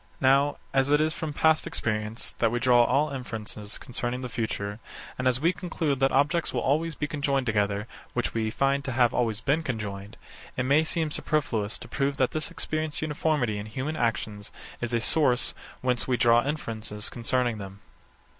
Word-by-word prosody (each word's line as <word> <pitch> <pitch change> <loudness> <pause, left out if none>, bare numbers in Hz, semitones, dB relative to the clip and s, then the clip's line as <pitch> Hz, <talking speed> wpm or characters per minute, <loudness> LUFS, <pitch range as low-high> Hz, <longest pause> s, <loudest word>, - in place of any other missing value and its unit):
Now, 140 +2 +4 0.2
as 135 +1 +3
it 145 0 +5
is 155 +1 +2
from 160 -3 -4
past 160 +2 +3
experience 110 +1 -2
that 115 - +4
we 120 - 0
draw 120 0 +5
all 150 +4 +2
inferences 110 -5 -5
concerning 125 0 -3
the 125 - -4
future, 105 -2 -3 0.4
and 130 - -1
as 125 0 +3
we 170 +5 +3
conclude 165 -6 -2
that 135 0 +3
objects 150 +5 +2
will - - -1
always 155 +3 +1
be 150 - -2
conjoined 140 -3 0
together 105 -2 +1 0.3
which 125 - -1
we 110 -1 0
find 135 +4 +1
to 130 - -2
have 120 -1 +3
always 110 -3 0
been 140 +6 +2
conjoined; 105 -6 -5 0.4
it 130 - +1
may 140 +5 +4
seem 160 -1 -1
superfluous 125 -10 -1
to - - -10
prove 140 0 -1
that 130 -1 +2
this 155 -1 -2
experienced 155 -1 -3
uniformity 150 -8 0
in 105 - -6
human 130 +8 -3
actions 110 -5 -2 0.3
is 120 -1 -2
a 120 - +2
source 125 0 +3 0.3
whence 125 -1 0
we 125 -2 +2
draw 120 0 +5
inferences 110 -7 -3
concerning 120 -1 0
them. 95 0 -9
130 Hz, 185 wpm, -27 LUFS, 110-145 Hz, 0.4 s, it